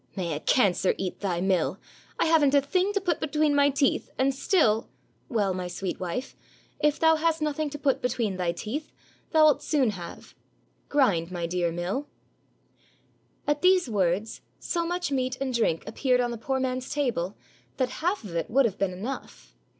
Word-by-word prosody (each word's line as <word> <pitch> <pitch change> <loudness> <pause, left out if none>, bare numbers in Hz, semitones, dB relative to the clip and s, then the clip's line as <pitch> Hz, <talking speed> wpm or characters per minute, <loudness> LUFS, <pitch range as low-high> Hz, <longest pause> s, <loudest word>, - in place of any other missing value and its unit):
"May 175 -4 -2
a 145 - -3
cancer 195 -2 +2
eat 185 -2 -4
thy 180 -4 -1
mill! 185 -1 +1 0.4
I - - +3
haven't 305 -4 +4
a 280 - +6
thing 365 +8 +1
to 400 - +1
put 355 -5 -1
between 305 -1 +1
my 285 0 +4
teeth, 280 -1 +1
and 270 +1 +2
still 265 - +2
— - - -39
" - - -39
"Well, 205 -7 +1
my 180 -1 -4
sweet 180 +1 -4
wife, 185 +9 -4 0.4
if 300 0 +2
thou 320 0 +5
hast 325 0 +1
nothing 305 0 -1
to 295 - -6
put 275 -2 +1
be 250 - +1
tween 225 -6 -1
thy 180 -2 0
teeth, 230 - -5 0.4
thou 315 -2 +6
'It 295 - +1
soon 270 -7 +1
have. 175 -4 -9 0.6
Grind, 195 - +2
my 175 -2 -3
dear 175 0 0
mill." 180 - -3 1.4
At 295 0 0
these 365 -3 +4
words, 195 +2 0 0.2
so 340 -1 -2
much 350 -2 -2
meat 255 -1 -1
and 265 -1 -2
drink 220 -9 +1
appeared 250 +3 +1
on 240 -1 +1
the 235 - -4
poor 265 +3 -1
man's 255 0 -2
table 230 -10 -1 0.4
that 255 -2 +1
half 360 +5 0
of 185 -5 -8
it 165 - -2
would 270 +3 +4
have 210 -5 -2
been 195 -2 0
enough. 225 +9 -7
255 Hz, 190 wpm, -27 LUFS, 190-295 Hz, 1.4 s, a